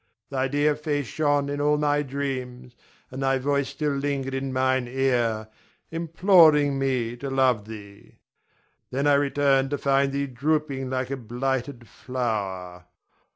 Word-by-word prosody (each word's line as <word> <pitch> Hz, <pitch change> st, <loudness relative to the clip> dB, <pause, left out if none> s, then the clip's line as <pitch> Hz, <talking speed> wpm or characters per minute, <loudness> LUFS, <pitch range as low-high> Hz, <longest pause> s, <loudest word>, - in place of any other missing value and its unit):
Thy 135 Hz, -1 st, 0 dB
dear 145 Hz, +2 st, +2 dB
face 145 Hz, -2 st, -2 dB
shone 145 Hz, +1 st, 0 dB
in 145 Hz, 0 st, -3 dB
all 150 Hz, +1 st, +3 dB
my 145 Hz, 0 st, +1 dB
dreams, 130 Hz, -3 st, -5 dB, 0.4 s
and 130 Hz, +2 st, -6 dB
thy 135 Hz, 0 st, +2 dB
voice 140 Hz, +1 st, 0 dB
still 150 Hz, -1 st, -2 dB
lingered 140 Hz, -1 st, -2 dB
in 135 Hz, 0 st, -3 dB
mine 130 Hz, -1 st, +1 dB
ear, 120 Hz, -4 st, 0 dB, 0.4 s
imploring 165 Hz, -4 st, +4 dB
me 125 Hz, -3 st, -1 dB
to 135 Hz, +3 st, -5 dB
love 130 Hz, -5 st, +2 dB
thee. 100 Hz, -2 st, -11 dB, 0.7 s
Then 140 Hz, +3 st, -1 dB
I 145 Hz, -, +5 dB
returned 140 Hz, -1 st, +2 dB
to 145 Hz, -, -1 dB
find 140 Hz, 0 st, +2 dB
thee 140 Hz, +1 st, -1 dB
drooping 140 Hz, 0 st, -1 dB
like 130 Hz, 0 st, -2 dB
a 135 Hz, -, -2 dB
blighted 125 Hz, +1 st, -3 dB
flower. 95 Hz, -8 st, -4 dB
135 Hz, 145 wpm, -25 LUFS, 125-145 Hz, 0.7 s, I